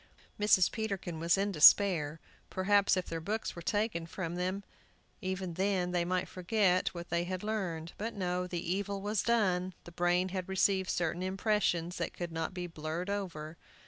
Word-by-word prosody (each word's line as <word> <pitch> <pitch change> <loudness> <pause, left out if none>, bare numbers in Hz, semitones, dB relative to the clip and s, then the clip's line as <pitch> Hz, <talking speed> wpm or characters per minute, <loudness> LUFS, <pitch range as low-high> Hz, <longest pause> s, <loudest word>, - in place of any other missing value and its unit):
Mrs. 205 -3 +4
Peterkin 195 -6 -3
was 170 +3 +3
in 200 +1 0
despair. 160 -2 +6 0.3
Perhaps, 200 +1 +3
if 185 - -1
their 165 -1 -4
books 215 +6 -3
were 170 - -7
taken 205 -3 -1
from 170 -1 -4
them 185 +3 -2 0.6
even 185 -2 -3
then, 185 0 0
they 175 -1 +1
might 180 +1 -1
forget 185 0 +1
what 170 0 -7
they 170 0 +1
had 185 +1 -4
learned. 180 -7 -3
But 225 +2 -3
no, 180 -2 -1
the 175 -2 -4
evil 200 0 -2
was 205 +1 0
done; 185 -6 +1
the 175 - -11
brain 175 +1 +1
had 185 0 -4
received 190 -1 +2
certain 170 +1 -1
impressions 185 -3 0
that - - -3
could 175 -1 -4
not 165 0 -2
be 180 -1 -5
blurred 165 +3 -4
over. 165 -6 -4
185 Hz, 175 wpm, -32 LUFS, 170-200 Hz, 0.6 s, despair